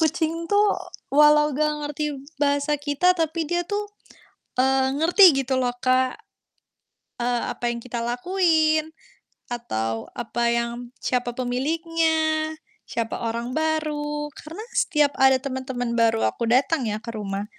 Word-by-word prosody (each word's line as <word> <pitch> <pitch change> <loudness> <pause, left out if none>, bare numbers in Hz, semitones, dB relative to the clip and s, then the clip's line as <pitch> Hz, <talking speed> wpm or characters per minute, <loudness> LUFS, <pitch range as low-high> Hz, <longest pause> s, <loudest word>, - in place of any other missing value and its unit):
kucing 320 0 +1 0.2
tuh 415 +1 +4 0.5
walau 300 0 +5
enggak 300 +1 +1 0.2
ngerti 295 +1 -3 0.4
bahasa 285 +1 +2
kita 290 +5 +2
tapi 325 -1 -1
dia 350 +1 0
tuh, 410 +4 -3 0.7
eee, 265 +1 +2
ngerti 325 -3 +6
gitu 260 0 0
loh, 245 -1 0
Kak. 255 0 +2 1.0
Eee, 240 0 0
apa 240 0 -2
yang 235 - -5
kita 235 -1 -4
lakuin, 315 +3 +1 0.6
atau 115 - -3
apa 240 0 -3
yang 235 +1 -3
siapa 245 -1 -1
pemiliknya, 315 +4 0 0.4
siapa 230 -1 -3
orang 235 +2 -3
baru. 300 -2 -1
Karena 335 +9 -9
setiap 295 -2 +2
ada 265 0 +6
temen-temen 260 -3 -4
baru 225 -1 +3
aku 235 - -4
datang 260 +2 +2
ya, 215 0 -3
ke 235 - -6
rumah. 200 -2 -4
275 Hz, 130 wpm, -24 LUFS, 240-315 Hz, 1.0 s, ngerti